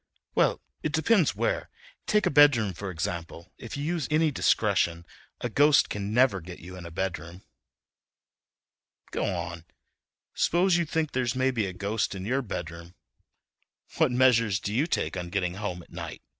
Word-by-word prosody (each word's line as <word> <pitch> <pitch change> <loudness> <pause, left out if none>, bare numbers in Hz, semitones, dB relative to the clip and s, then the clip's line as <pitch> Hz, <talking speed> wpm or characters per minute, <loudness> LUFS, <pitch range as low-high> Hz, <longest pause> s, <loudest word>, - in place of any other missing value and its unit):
"Well, - - +2 0.2
it 155 - -2
depends 175 +2 +3
where. - - -1 0.4
Take 210 0 +3
a - - +2
bedroom, 135 -9 +5
for 100 +3 -6
example. 85 0 -5
If 115 - -7
you 140 - -3
use 160 -3 -1
any 155 0 +3
discretion 90 -9 +1 0.4
a - - -1
ghost 145 +5 +4
can 105 0 -3
never 120 -5 +3
get 90 +1 -9
you 90 +3 -10
in 90 -2 -8
a - - -8
bedroom." 85 0 -5 1.7
"Go - - -1
on, 85 -1 -4 0.7
s'pose 175 +2 +2
you 170 -1 +2
think 160 -1 -1
there's 125 -1 -1
maybe 130 -5 +1
a 95 - -5
ghost 100 +2 -2
in 95 0 -6
your 130 +5 0
bedroom—what 85 - -6
measures 115 -5 +3
do 100 +2 -4
you 140 +8 +1
take 80 - -1
on 90 -1 -4
getting 90 -2 -1
home 95 -3 -5
at - - -22
night?" - - -7
105 Hz, 160 wpm, -27 LUFS, 90-140 Hz, 1.7 s, bedroom